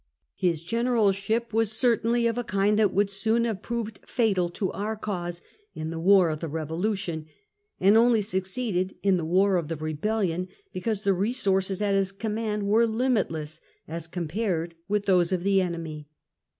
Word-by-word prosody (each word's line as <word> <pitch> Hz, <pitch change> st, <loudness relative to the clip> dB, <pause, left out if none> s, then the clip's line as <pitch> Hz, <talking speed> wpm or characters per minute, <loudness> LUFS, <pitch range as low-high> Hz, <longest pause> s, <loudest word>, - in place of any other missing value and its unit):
His 170 Hz, -4 st, 0 dB
General 230 Hz, +1 st, +2 dB
ship 220 Hz, +4 st, -2 dB
was 225 Hz, -1 st, +2 dB
certainly 235 Hz, 0 st, +2 dB
of 230 Hz, -1 st, +1 dB
a 245 Hz, -, -2 dB
kind 205 Hz, -1 st, +1 dB
that 210 Hz, -3 st, +4 dB
would 200 Hz, 0 st, +1 dB
soon 225 Hz, +4 st, +1 dB
have 215 Hz, -4 st, -2 dB
proved 230 Hz, -2 st, -4 dB
fatal 200 Hz, -8 st, +1 dB
to 185 Hz, +2 st, -2 dB
our 215 Hz, +2 st, -3 dB
cause 175 Hz, -5 st, -4 dB, 0.3 s
in 155 Hz, +1 st, -4 dB
the 165 Hz, -, -4 dB
war 185 Hz, -1 st, +5 dB
of 155 Hz, -, -4 dB
the 165 Hz, -, -4 dB
Revolution, 160 Hz, +2 st, -3 dB, 0.5 s
and 200 Hz, +3 st, +5 dB
only 230 Hz, -1 st, +5 dB
succeeded 190 Hz, -1 st, -2 dB
in 195 Hz, -2 st, +4 dB
the 170 Hz, -, -2 dB
war 190 Hz, +3 st, +3 dB
of 165 Hz, -3 st, -2 dB
the 165 Hz, -, -3 dB
Rebellion, 175 Hz, +4 st, -1 dB, 0.3 s
because 210 Hz, +2 st, -2 dB
the 200 Hz, -1 st, +3 dB
resources 195 Hz, -2 st, 0 dB
at 200 Hz, -1 st, +1 dB
his 195 Hz, -1 st, +1 dB
command 210 Hz, 0 st, -2 dB
were 220 Hz, +3 st, +4 dB
limitless, 215 Hz, -, -1 dB, 0.3 s
as 165 Hz, +1 st, -5 dB
com 170 Hz, -1 st, -4 dB
pared 175 Hz, -2 st, -2 dB
with 205 Hz, 0 st, 0 dB
those 180 Hz, -3 st, +3 dB
of 180 Hz, -2 st, 0 dB
the 195 Hz, 0 st, +3 dB
enemy. 165 Hz, -4 st, -4 dB
195 Hz, 175 wpm, -26 LUFS, 175-220 Hz, 0.5 s, war